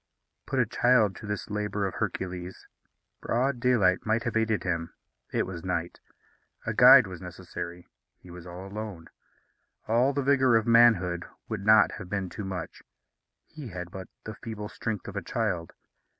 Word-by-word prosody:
Put 135 - -2
a 125 - +4
child 115 -3 +3
to 105 - -9
this 105 0 -4
labour 105 -1 -1
of 95 - -3
Hercules. 90 0 -4 0.6
Broad 125 +2 0
daylight 115 -7 +3
might 115 +1 0
have 120 -2 -3
aided 110 -1 +1
him. 85 -2 -3 0.4
It - - 0
was 90 -3 -7
night. 85 -2 -3 0.7
A - - -1
guide - - +9
was - - -8
necessary. 85 +1 -8 0.3
He 90 - -15
was 90 0 -10
alone. 95 0 -7 0.8
All 120 +5 +3
the 140 0 -1
vigour 130 -3 +4
of 115 -1 +3
manhood 105 -8 +4 0.2
would 110 -3 -4
not 110 +1 +6
have 90 -4 -9
been 100 -2 -2
too 105 - -6
much. 90 -3 -6 0.6
He 150 -4 -10
had 90 -3 -7
but 95 -1 -8 0.2
the 110 - -6
feeble 105 -2 -7
strength 110 -5 -4
of - - -7
a - - -2
child. 85 -2 -2
105 Hz, 165 wpm, -28 LUFS, 90-115 Hz, 0.8 s, guide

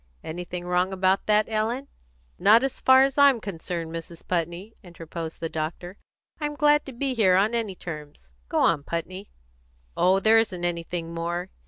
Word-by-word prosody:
"Anything 175 +2 -6
wrong 180 +1 +1
about 190 0 +1
that, 210 0 +4
Ellen?" 225 +5 -2 0.5
"Not 215 +6 +6
as 270 - -2
far 260 0 +6
as 275 +1 0
I'm 280 -4 +6
concerned, 170 -4 -5
Mrs. 165 0 -8
Putney," 175 +5 -3
interposed 165 -3 -8
the 165 - -1
doctor. 165 +4 -5 0.4
"I'm 295 -1 -3
glad 295 0 +3
to - - -6
be 265 +2 -2
here 200 -6 +4
on 205 +5 +2
any 225 -5 -1
terms. 150 - -9 0.2
Go - - -1
on, - - +3
Putney." 185 +6 -5 0.7
"Oh, 190 +2 +3
there 220 +3 +5
isn't 185 -6 -1
anything 170 -1 -3
more. 170 +2 -3
185 Hz, 165 wpm, -25 LUFS, 170-225 Hz, 0.7 s, Not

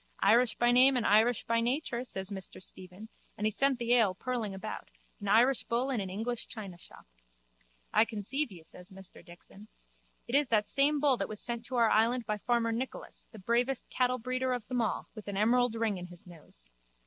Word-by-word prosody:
Irish 240 0 +4
by 240 0 +3
name 255 +2 +6
and 240 - -1
irish 220 +3 +3
by 230 0 +1
nature, 245 0 -1
says 190 -5 -2
Mr 190 -2 -7
Stephen, 185 +2 -7 0.3
and 210 - -2
he 215 - +2
sent 275 +4 +2
the 240 0 +1
ale 220 -6 +4
purling 235 -1 -3
about, 195 +3 -7 0.3
an 205 - -6
Irish 240 +6 +4
bull 245 +4 0
in 250 - -1
an 190 - -5
English 225 +5 -4
chinashop. 195 -6 -10 0.9
I - - +5
conceive 235 +6 -2
you, 170 -4 -12
says 180 +3 -10
Mr 190 -1 -12
Dixon. 185 +4 -14 0.6
It 235 - -7
is 285 0 +3
that 210 -3 +1
same 285 +2 +3
bull 280 -3 +3
that - - -3
was 215 -1 -2
sent 235 -1 0
to 255 - -5
our 230 -2 +3
island 230 +2 +2
by 210 -1 -2
farmer 235 0 0
Nicholas, 245 +3 -4
the 220 - -12
bravest 235 +6 -1
cattlebreeder 255 0 0
of 240 -3 -7
them 250 -2 0
all, 225 - -2
with 215 -2 -11
an 200 -1 -4
emerald 240 +2 +2
ring 225 -4 -1
in 180 - -8
his 175 -1 -11
nose. 155 - -12
230 Hz, 200 wpm, -30 LUFS, 205-250 Hz, 0.9 s, name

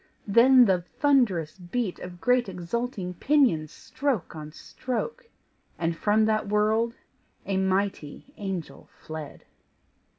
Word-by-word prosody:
then 245 +4 +6
the 185 -4 +2
thunderous 195 - +1
beat 185 +2 -3
Of 180 -1 -9
great 245 0 +2
exulting 190 +2 -4
pinions 180 - +2
stroke 260 -11 -3
on 155 -1 -8
stroke! 460 - -5 0.5
And 165 0 -1
from 215 +5 +2
that 215 -2 0
world 220 +3 +1 0.5
a 195 -1 -1
mighty 190 - -2
angel 190 -5 -6
fled. 155 -2 -8
205 Hz, 110 wpm, -26 LUFS, 175-245 Hz, 0.5 s, then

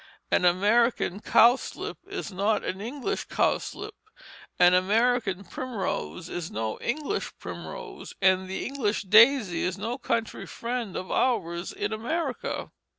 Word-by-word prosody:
An 180 - +3
American 205 +2 +3
cowslip 235 +4 +3
is 395 - -5
not 200 +3 +1
an 190 +1 -3
English 250 +5 -3
cowslip, - - -1 0.6
an 180 0 +6
American 205 +1 +2
primrose 200 -6 -4
is 175 -2 -5
no 110 0 -3
English 305 - -2
primrose, - - -8
and 190 -1 +3
the 190 - -3
English 240 -7 -1
daisy 215 -1 +5
is 180 +1 -1
no 230 +6 -3
country 230 -2 -2
friend 235 -4 -4
of 185 - -5
ours 175 -8 0
in 205 +1 -3
America. 260 +5 -3
215 Hz, 125 wpm, -27 LUFS, 185-245 Hz, 0.6 s, an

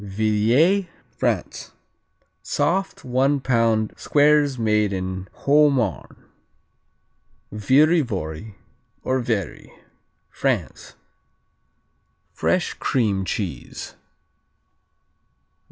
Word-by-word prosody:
Villiers 110 - +2 0.3
France - - -2 0.7
Soft, 190 +3 -1
one 135 +3 +1
pound 115 -4 +1
squares 145 -2 +3
made 105 -2 +1
in 95 0 -4
Haute 150 +1 +3
Marne. 115 -9 -3 1.3
Viry 145 - +4
vory, 95 - -6 0.5
or 130 0 0
Vary 110 -6 -3 0.6
France - - -3 1.4
Fresh - - 0
cream 105 -7 0
cheese. 95 -6 -5
115 Hz, 70 wpm, -22 LUFS, 105-140 Hz, 1.4 s, Viry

